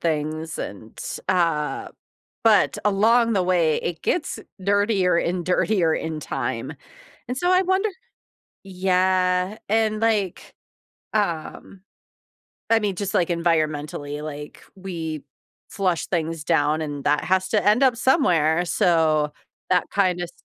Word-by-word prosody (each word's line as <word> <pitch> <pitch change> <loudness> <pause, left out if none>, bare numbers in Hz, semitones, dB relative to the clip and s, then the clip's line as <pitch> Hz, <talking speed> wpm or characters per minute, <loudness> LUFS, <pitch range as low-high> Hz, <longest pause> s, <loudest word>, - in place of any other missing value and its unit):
things 155 0 -2
and, 110 +2 -8 0.3
uh, 165 -5 0 0.6
but 220 -2 +4
along 225 +3 +3
the 190 - +2
way 175 -4 +2
it 170 -2 -4
gets 350 - -1 0.2
dirtier 200 -2 +2
and 175 +1 -1
dirtier 180 -2 +2
in 160 -1 -4
time, - - -3 0.6
and 250 - -3
so 355 +6 +1
I 370 +1 +4
wonder 380 +3 +1 0.8
Yeah, 185 0 +1
and 215 0 +1
like, 215 -5 -1 0.6
um 190 -1 -3 0.9
I 225 0 +5
mean, 205 -3 -1
just, 200 +1 -3
like, 175 - +2
environmentally, 155 -3 -1
like, 150 -1 -8
we 165 -5 -5 0.5
flush 185 -4 -1
things 165 -2 -2
down 155 -1 +1
and 145 -2 -5
that 150 +1 +2
has 185 0 +1
to 210 -2 +1
end 210 +5 +4
up 255 -3 +4
somewhere, 175 - +3
so 160 -4 +2 0.4
that 180 -1 +3
kinda 180 -3 +1
s 170 - -7
180 Hz, 125 wpm, -23 LUFS, 160-205 Hz, 0.9 s, I